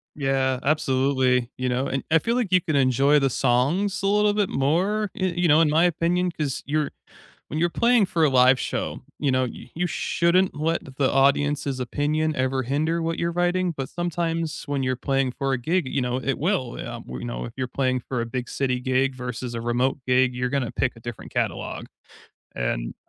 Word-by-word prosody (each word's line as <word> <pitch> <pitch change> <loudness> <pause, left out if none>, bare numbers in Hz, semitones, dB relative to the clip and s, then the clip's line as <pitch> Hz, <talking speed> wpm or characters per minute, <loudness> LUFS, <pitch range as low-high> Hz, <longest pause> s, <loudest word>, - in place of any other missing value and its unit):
Yeah. 135 -2 0
Absolutely, 130 -4 +2
you 130 0 -1
know? 125 +2 0
And 135 - -2
I 165 - +6
feel 230 +8 -1
like 235 -7 -1
you 180 -1 +5
can 155 - -2
enjoy 135 +2 +4
the 135 -1 +2
songs 140 - +1
a - - +2
little 210 +1 +3
bit 205 -2 +1
more, 190 +10 +1
y 185 -4 -1
you 175 0 +2
know, 155 +1 +5
in 155 - +3
my 160 +3 +4
opinion, 175 +1 +1
'cause 145 -5 -3
you're 150 0 -1 0.6
when 155 - -3
you're 170 - +3
playing 235 -2 +3
for 165 -3 +1
a 145 - +4
live 130 0 +5
show, - - -3 0.2
you 145 -3 +1
know, 130 0 +2
y 125 - -8
you 180 +2 0
shouldn't 175 +2 +1
let 155 -3 -2
the 135 -2 +2
audience's 140 0 +2
opinion 150 +4 -1
ever 130 0 0
hinder 155 +6 0
what 165 0 -2
you're 170 0 0
writing, 175 +1 +1
but 135 -1 -4
sometimes 165 -2 -2
when 145 -2 -1
you're 130 -1 0
playing 135 -1 0
for 135 +1 -2
a 130 - +1
gig, 165 +4 0
you 135 - -1
know, 125 0 -1
it 130 +1 -2
will, 155 -7 -1
um, - - -7
you 65 0 -6
know, - - -4
if - - -7
you're 130 -1 -2
playing 130 -1 0
for 125 0 -4
a 115 - -4
big 125 0 -4
city 130 -2 -1
gig 130 +1 +1
versus 125 -1 -5
a 115 - -3
remote 125 +4 0
gig, 125 0 +3
you're 125 0 -1
gonna 135 -3 -1
pick 125 -3 -1
a - - -13
different 120 -1 -8
catalog, - - -2 0.7
and - - -2
140 Hz, 210 wpm, -24 LUFS, 130-165 Hz, 0.7 s, I